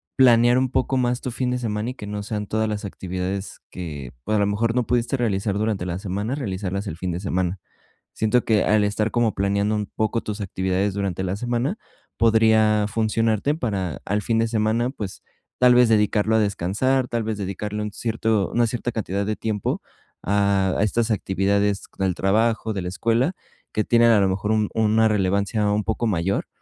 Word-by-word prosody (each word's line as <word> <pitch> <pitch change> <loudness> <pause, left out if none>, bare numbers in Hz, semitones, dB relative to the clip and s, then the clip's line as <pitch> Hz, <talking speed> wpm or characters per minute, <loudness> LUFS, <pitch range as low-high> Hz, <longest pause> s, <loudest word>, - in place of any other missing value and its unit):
planear 120 -2 +5
un 130 0 +1
poco 130 +1 0
más 125 0 0
tu 125 - -4
fin 125 +2 -2
de 125 - 0
semana, 110 -1 -2
y - - -7
que 105 - -8
no 105 0 -4
sean 105 0 -3
todas 110 +2 -1
las 105 0 -3
actividades 95 +1 -5
que, 75 -8 -6
pues, 110 - 0
a - - +3
lo 100 - +3
mejor 115 +3 0
no 125 -2 +1
pudiste 120 +1 0
realizar 100 -3 0
durante 105 -4 -1
la 85 - -2
semana 100 +6 -3
realizarlas 100 -5 -3
el 80 - -5
fin 90 0 -3
de 85 - -3
semana. 95 -1 -1 0.6
Siento 110 +3 +1
que 110 -3 +2
al 105 0 +3
estar 105 +1 0
como 120 -3 +1
planeando 100 +2 +1
un 105 -1 -1
poco 110 +1 -1
tus 105 0 -5
actividades 95 +1 -1
durante 95 -2 -2
la 95 +1 -1
semana 120 - -1 0.4
podría 110 -2 +4
funcionarte 110 +4 +1
para 100 - -3
al 105 +2 0
fin 115 +2 +1
de 115 - +2
semana, 110 +2 +1
pues, 110 -8 -7 0.4
tal 125 -1 +6
vez 125 -1 +5
dedicarlo 105 0 +2
a - - +4
descansar, 105 +6 0
tal 115 - -1
vez 110 -1 -3
dedicarle 105 +2 -4
un 105 - -4
cierto 110 -2 0
una 120 0 +2
cierta 120 0 -3
cantidad 100 -2 -2
de 110 +1 -1
tiempo 105 -3 -2 0.4
a 100 -1 +2
a 100 - +2
estas 115 +2 +1
actividades 100 0 0 0.2
del 95 -2 +1
trabajo, 110 +3 +1
de 95 - -3
la 90 - -4
escuela, 115 - +1 0.4
que 110 - +1
tienen 115 0 +4
a 110 - +5
lo 95 - +3
mejor 100 +3 -1
un 110 -1 +1
una 110 0 +3
relevancia 100 +1 +1
un 105 0 +1
poco 110 +1 -1
mayor, 95 -1 0
105 Hz, 195 wpm, -23 LUFS, 100-115 Hz, 0.6 s, tal